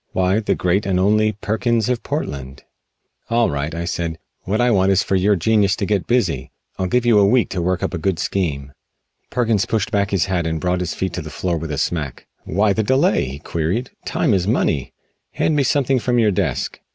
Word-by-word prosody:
Why 95 +3 +2
the 110 - 0
Great 95 +3 0
and 95 -2 +1
Only 110 +3 +3
Perkins 110 +2 0
of 125 -1 0
Portland?" 70 -1 -5 0.7
"All 115 -5 +2
right," 70 +3 -3
I 85 +1 -3
said, 85 -1 -3 0.3
"what 100 +4 0
I 120 0 +3
want 95 -2 +3
is 95 - +3
for 95 - 0
your 100 +2 +3
genius 105 +2 +2
to 100 - -2
get 100 -2 -1
busy. 85 - 0 0.3
I'll 95 - 0
give 125 +5 +1
you 115 -3 +5
a 100 - +5
week 120 +3 +3
to 90 - -2
work 90 +1 -1
up - - -2
a 90 - -2
good 90 +1 0
scheme." 75 -7 -2 0.6
Perkins 115 -5 +1
pushed 110 -3 -1
back 100 -1 +1
his 95 -3 +1
hat 90 -4 -1
and 80 0 -2
brought 90 +1 0
his 90 -2 -3
feet 95 -2 -2
to 90 - -3
the 80 - -8
floor 85 +3 -2
with 80 0 -4
a 75 - -3
smack. 75 -3 -3 0.2
"Why 100 +4 +2
the 110 - 0
delay?" 130 +6 +2
he 65 +2 -6
queried, 85 - -2
"time - - 0
is 95 -1 +1
money. 80 - 0 0.4
Hand 155 - +1
me 145 - +3
something 135 -1 +2
from 120 +1 0
your 110 -3 +4
desk." 90 -10 -2
95 Hz, 220 wpm, -20 LUFS, 85-110 Hz, 0.7 s, you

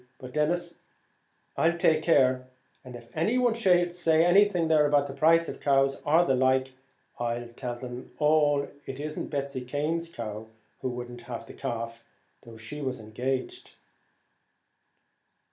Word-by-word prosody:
But, 130 -1 -10
Denis, 170 +3 -1 0.8
I'll 170 +1 +2
take 155 -2 +3
care; 130 -6 +3 0.4
and 125 -2 -10
if 115 -1 -13
any 205 +10 +1
one 245 -2 +3
should 180 -6 +2
say 165 -2 +3
anything 185 -1 +4
about 145 -2 +4
the 140 - -6
price 165 +3 +4
of - - -6
cows 135 -1 +2
or 165 +4 +3
the 135 - +2
like, 130 0 +2 0.5
I'll 120 0 -2
tell 120 +1 -5
them 125 +1 -8
all 150 -2 +3 0.2
it 135 0 -6
isn't 150 +1 -4
Betsy 140 -2 -3
Cane's 150 +6 -2
cow, 110 -6 -6 0.3
who 130 - -1
wouldn't 120 0 -7
have 115 -1 -5
the - - -12
calf, 115 0 -5 0.4
though 115 -1 -13
she 110 +7 -8
was 130 -3 -3
engaged." 125 +5 -4
140 Hz, 145 wpm, -27 LUFS, 125-165 Hz, 0.8 s, anything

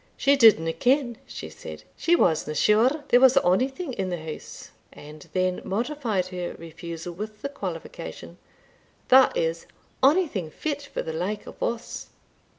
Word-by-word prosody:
"She 280 +1 +4
didna 210 - +5
ken," 250 - +1
she - - -7
said, - - -10
"she 345 - +3
wasna 160 - +1
sure 240 - +3
there 245 - +6
was 265 0 +6
onything 265 - +1
in 190 -5 -2
the 175 - -2
house," 155 -1 -9 0.2
and 150 +1 -13
then 185 0 0
modified 230 -2 -1
her 180 -1 -5
refusal 165 +1 -8
with 210 +3 -8
the 280 - -2
qualification 190 - -7 0.7
"that 265 - +6
is, - - -1 0.3
onything 275 - +2
fit 290 - -4
for 280 - -5
the 160 - -5
like 190 +6 -3
of - - -12
us." 235 +1 -3
215 Hz, 150 wpm, -25 LUFS, 175-275 Hz, 0.7 s, there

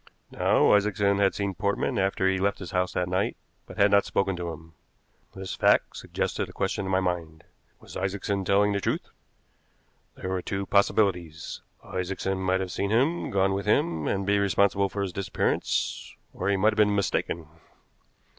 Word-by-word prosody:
Now, - - +3
Isaacson 100 -1 +2
had 100 -1 +3
seen 100 -1 -2
Portman 100 +5 -1
after 95 0 0
he 95 - +4
had 95 - -2
left 100 0 +1
his 90 - -8
house 90 0 0
that 90 0 -1
night, 95 +2 -1 0.3
but - - -11
had 100 0 +4
not 100 0 +5
spoken 95 -1 0
to 85 -1 -4
him. 80 0 -10 0.6
This 95 -1 -5
fact - - +3
suggested - - -3
a - - -12
question 100 - -2
to - - -3
my 95 0 +2
mind: 85 -4 -3 0.4
was - - -13
Isaacson 100 +1 -2
telling 100 +2 +3
the 100 - 0
truth? - - -2 1.1
There 95 - -5
were 95 -1 -1
two 100 +2 -3
possibilities. 90 -5 +1 0.2
Isaacson 95 +1 -3
might 95 0 +1
have 95 -1 -4
seen 100 +2 -2
him, 135 +10 +1
gone 95 0 +2
with 100 +1 -3
him, 85 -6 +1
and 100 0 -1
be 100 +1 +2
responsible 100 0 +2
for 100 0 -3
his 95 -2 -4
disappearance; 100 +1 -1 0.2
or 95 - -2
he 100 - +2
might 105 +3 +4
have - - -9
been 105 -1 +4
mistaken. 85 -4 -1
95 Hz, 185 wpm, -27 LUFS, 90-100 Hz, 1.1 s, not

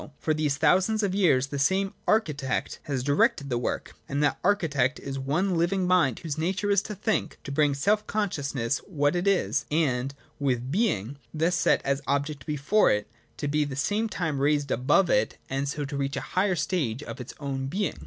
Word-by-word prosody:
For 155 - 0
these 150 -2 0
thousands 190 +8 +3
of 195 -2 0
years 170 -10 +3
the 140 - -3
same 190 +7 +1
Architect 150 - 0
has 135 -4 -2
directed 140 0 +2
the 120 - +1
work: - - -3 0.2
and 140 +1 0
that 145 - +1
Architect 155 -9 +1
is 135 - -6
the 135 - -4
one 170 +8 0
living 180 +3 +1
Mind 180 -9 +3
whose 155 -2 -5
nature 190 +5 0
is 200 -1 +4
to 210 - -6
think, 215 +3 -1
to 140 - -6
bring 145 0 +2
to - - -8
self 210 +7 +2
consciousness 145 - -1
what 145 -4 +1
it 175 +2 0
is, 195 -2 +1
and, 140 -4 0 0.2
with 135 -3 +1
its 120 +2 -8
being 145 - 0 0.2
thus 165 +3 +1
set 170 - +2
as 140 0 0
object 140 0 -1
before 150 +8 +3
it, 105 +1 0 0.3
to 145 - -3
be 150 +1 +1
at 145 - 0
the 135 - -5
same 210 +11 0
time 160 -8 -2
raised 145 -1 +1
above 150 +9 +3
it, 105 +1 +1
and 135 +1 -1
so 145 0 -3
to 140 +1 -5
reach 140 0 -2
a - - -2
higher 190 0 +2
stage 145 -9 -1
of 140 - -7
its 125 - -9
own 135 -2 -3
being. 195 +8 -2
150 Hz, 210 wpm, -27 LUFS, 140-185 Hz, 0.3 s, is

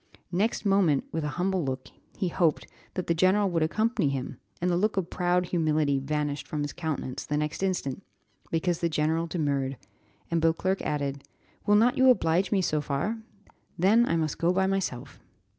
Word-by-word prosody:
Next 205 +5 0
moment, 195 -8 +3
with 160 -1 -2
a - - -1
humble 185 0 0
look, 130 -1 -4 0.3
he 185 - 0
hoped 165 -2 +1 0.3
that 185 - -2
the 170 - +2
general 185 +3 +3
would 165 -1 +1
accompany 215 - +1
him, 135 -2 -4 0.2
and 180 +1 +1
the - - +2
look 210 +3 +1
of 180 -2 -1
proud 180 0 +1
humility 155 -5 +1
vanished 145 -1 -2
from 150 0 -2
his 145 - -4
countenance 155 -6 -4
the 150 - -2
next 150 +3 -2
instant, 185 -5 -1 0.5
because 165 +1 0
the 170 - 0
general 160 +2 0
demurred, 140 -5 -1 0.5
and 165 -1 +1
Beauclerc 165 +4 +1
added, 140 -2 -2 0.4
"Will 205 - +5
not 245 +5 +4
you 260 0 +7
oblige 185 -6 +3
me 195 -3 +2
so 155 -3 +1
far? 150 +11 -2 0.6
Then 220 +7 +4
I - - +1
must 155 -3 -1
go 170 +1 +3
by 190 +1 +2
myself." 160 -10 -2
165 Hz, 180 wpm, -27 LUFS, 150-190 Hz, 0.6 s, you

